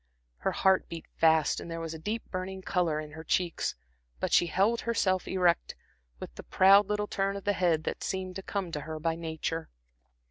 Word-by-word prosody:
Her - - -1
heart 190 -1 +3
beat 165 -1 -7
fast 160 -1 +4
and - - -8
there 165 0 -4
was 165 -1 -5
a 160 - -7
deep 215 +7 -3
burning 190 0 -4
color 170 -5 0
in 155 -1 -7
her 160 +2 -9
cheeks, 175 0 0 0.4
but - - -2
she 175 - +5
held 205 +7 +2
herself 190 -5 0
erect, 180 -3 +1 0.4
with - - -8
the - - -9
proud 195 +2 +6
little 210 0 0
turn 195 -1 -1
of 200 - -8
the 205 - +1
head 170 -4 +1
that - - -4
seemed 185 -1 -3
to - - -5
come 195 -2 -3
to 150 - -3
her 155 +1 -6
by 165 +1 0
nature. 165 0 -4
180 Hz, 205 wpm, -29 LUFS, 160-195 Hz, 0.4 s, proud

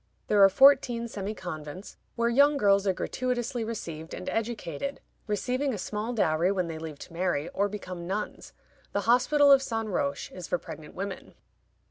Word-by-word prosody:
There 205 -1 +6
are 195 - +9
fourteen 245 0 +5
semi 210 -1 -5
convents 175 0 -7 0.2
where 235 0 +1
young 280 +5 +4
girls 200 -3 +3
are - - +5
gratuitously 245 +4 -2
received 165 -8 -6
and 185 - -8
educated, 225 - -3 0.3
receiving 255 +5 -1
a - - -5
small 210 +4 -3
dowry 175 -5 +2
when 185 -3 0
they 165 -1 -6
leave 160 -2 -7
to 170 - -18
marry 170 -3 -1
or 200 +1 0
become 185 -4 -7
nuns. 205 +3 -4 0.4
The 200 - +1
Hospital 280 +6 +4
of 275 -1 +7
St. 225 -4 -2
Roch 140 -8 -2
is 180 -2 -8
for 180 - +1
pregnant 155 -2 -10
women. 195 0 -6
205 Hz, 170 wpm, -28 LUFS, 175-240 Hz, 0.4 s, are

